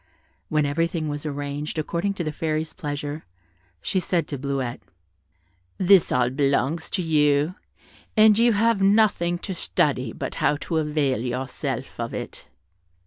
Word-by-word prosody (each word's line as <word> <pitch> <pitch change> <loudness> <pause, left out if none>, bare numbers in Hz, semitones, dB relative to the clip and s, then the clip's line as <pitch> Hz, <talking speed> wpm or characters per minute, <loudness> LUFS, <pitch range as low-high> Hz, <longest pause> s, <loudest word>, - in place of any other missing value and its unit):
When 155 -1 +2
everything 165 +2 -1
was 145 +1 -4
arranged 145 +1 -4
according 170 +6 -1
to 175 - -3
the 155 - -2
Fairy's 155 +1 -2
pleasure, 145 -2 -5 0.6
she 190 - 0
said 175 -1 0
to 140 - -4
Bleuette, 135 -3 -3 1.0
"This 190 -1 +5
all 125 -1 +2
belongs 140 +3 0
to 185 - -1
you, 150 0 +2 0.6
and 215 -1 +7
you 235 +2 +4
have 220 0 +2
nothing 195 -4 +3
to 190 +2 -5
study 130 -8 0
but - - -5
how 145 - +3
to 165 - -2
avail 150 -5 +1
yourself 125 +2 -4
of - - -3
it." - - -7
155 Hz, 140 wpm, -24 LUFS, 140-175 Hz, 1.0 s, and